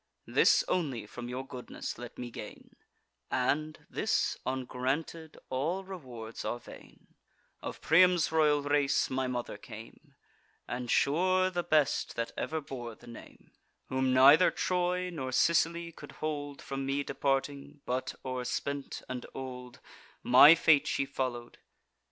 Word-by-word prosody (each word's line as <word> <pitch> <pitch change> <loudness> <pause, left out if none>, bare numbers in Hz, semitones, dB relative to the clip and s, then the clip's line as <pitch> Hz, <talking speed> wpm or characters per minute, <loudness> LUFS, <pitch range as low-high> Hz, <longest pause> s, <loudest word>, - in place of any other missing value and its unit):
This - - +4
only 135 - -1
from 120 +3 -8
your 130 +2 -4
goodness 125 -3 -7
let 120 -1 -9
me 120 -1 -6
gain - - -10 0.5
(And, 155 +5 -1
this - - 0
ungranted, 130 +5 -3
all 160 +9 -1
rewards 125 -12 -8
are - - -2
vain) 120 - -15 0.5
Of - - -7
Priam's 175 0 +4
royal 150 -2 +3
race 145 -2 +1
my 130 0 0
mother 125 -1 -4
came— - - -12 0.5
And 125 0 -4
sure 185 +8 +2
the 175 -1 -1
best 155 -4 +1
that 115 0 -2
ever 160 - -2
bore 120 -5 -7
the - - -18
name— 120 -1 -13 0.4
Whom 130 0 +1
neither 140 +7 +7
Troy 180 0 -1
nor 135 -6 -4
Sicily 170 +4 +2
could - - -12
hold 145 -2 -5
From 135 0 -4
me 135 +1 -1
departing, 140 +1 -2
but, 130 +1 -2
o'erspent 130 +2 -3
and 125 -1 -6
old, 125 -2 -8 0.4
My 140 +6 +9
fate 150 -3 +4
she 140 - 0
follow'd. 125 -3 -4
140 Hz, 135 wpm, -30 LUFS, 125-160 Hz, 0.5 s, My